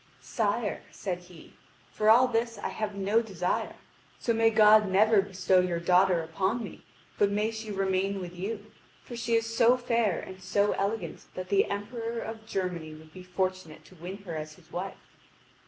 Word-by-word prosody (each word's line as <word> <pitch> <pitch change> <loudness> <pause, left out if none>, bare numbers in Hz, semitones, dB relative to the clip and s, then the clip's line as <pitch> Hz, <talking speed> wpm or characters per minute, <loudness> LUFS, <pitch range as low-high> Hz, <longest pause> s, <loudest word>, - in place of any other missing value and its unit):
"Sire," 210 -1 -1
said 180 -3 -4
he, 175 -2 -15 0.4
"for 215 0 +1
all 245 +4 +7
this 230 -1 -1
I - - -3
have 215 -2 -4
no 200 +3 +2
desire. 190 -6 -2 0.4
So 235 - 0
may 225 0 +4
God 215 -1 +6
never 210 +2 +5
bestow 190 -1 +2
your 180 -2 0
daughter 180 0 +3
upon 190 +8 -1
me, 205 - -9 0.4
but 205 - +4
may 210 +2 0
she 220 -1 -7
remain 195 0 0
with 180 -1 -7
you; 205 +3 -5 0.3
for 240 - -8
she 235 0 0
is 230 0 0
so 235 +2 +5
fair 230 -6 +1
and 185 0 -9
so 205 +2 +1
elegant 205 +3 -3
that 185 0 -6
the 200 -1 +4
Emperor 230 +3 -4
of 220 -1 -6
Germany 175 -6 -3
would 155 0 -15
be 185 - -10
fortunate 185 -2 -3
to 185 - -17
win 180 +3 -7
her 170 -4 -6
as 155 0 -5
his 170 -4 -22
wife." 190 +2 -7
200 Hz, 180 wpm, -28 LUFS, 185-225 Hz, 0.4 s, all